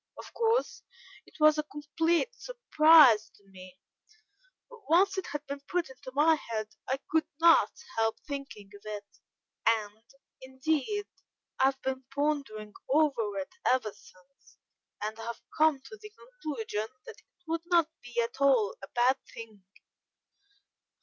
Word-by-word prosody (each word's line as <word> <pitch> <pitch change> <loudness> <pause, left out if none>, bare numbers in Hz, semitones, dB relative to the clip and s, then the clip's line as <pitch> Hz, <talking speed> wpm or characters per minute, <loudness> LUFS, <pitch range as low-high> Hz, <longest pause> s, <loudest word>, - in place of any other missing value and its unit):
Of - - -11
course, 465 +1 0 0.5
it - - -19
was 305 0 +5
a 300 - -4
complete 325 +9 0
surprise 310 - +5
to 200 - -25
me, 185 -1 -14 0.9
but 480 -1 -14
once 360 +5 +4
it 380 - -3
had 295 0 -5
been 280 0 -5
put 355 -6 -1
into 260 0 -11
my 310 +3 +5
head, 225 -7 -4 0.2
I 265 - +1
could 320 0 +2
not 335 0 +6 0.3
help 225 0 +1
thinking 275 -9 -8
of 200 - -14
it, 210 -1 -6 0.6
and, 215 -1 +1 0.4
indeed, 295 +9 -2 0.5
I 265 - +5
have 270 0 +1
been 265 0 -3
pondering 275 -8 -2 0.2
over 265 -8 +1
it 190 - -5
ever 250 -5 +1
since, 185 +10 -22 0.5
and 215 +1 -4
have 230 +1 -6 0.2
come 310 -2 +4
to 435 +9 -12
the 425 0 -11
conclusion 300 - -5 0.2
that - - -11
it - - -33
would 330 0 -1
not 340 -3 +4
be 245 -1 -5
at 245 +4 -7
all 255 -7 +3
a 195 - -8
bad 250 +2 +2
thing." 220 -4 -11
275 Hz, 145 wpm, -29 LUFS, 225-320 Hz, 0.9 s, not